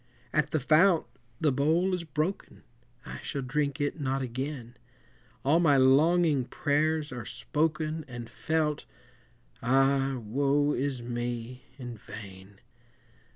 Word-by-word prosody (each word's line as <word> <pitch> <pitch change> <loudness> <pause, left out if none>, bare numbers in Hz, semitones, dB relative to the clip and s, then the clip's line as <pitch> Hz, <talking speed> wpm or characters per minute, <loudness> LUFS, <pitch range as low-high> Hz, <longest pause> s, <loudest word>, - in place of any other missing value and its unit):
At 150 -1 +2
the 155 - 0
fount 160 +5 +4 0.3
the 150 - +3
bowl 160 +8 +2
is 180 -2 -1
broken, 160 +4 -3 0.4
I - - -7
shall 140 -2 -4
drink 140 +2 -1
it 145 +2 -1
not 135 0 -1
again, 130 -1 -5 0.7
All 150 +5 +4
my 150 -5 +4
longing 145 +2 +4
prayers 150 +2 0
are 120 -2 -5
spoken, 155 +6 -1
And 120 -2 -7
felt, 155 +4 -1 0.8
ah, 135 +2 +2
woe 140 +6 +1
is 130 -2 -2
me, 120 +1 -4
in 120 -3 -7
vain! 95 -1 -11
140 Hz, 120 wpm, -29 LUFS, 125-155 Hz, 0.8 s, fount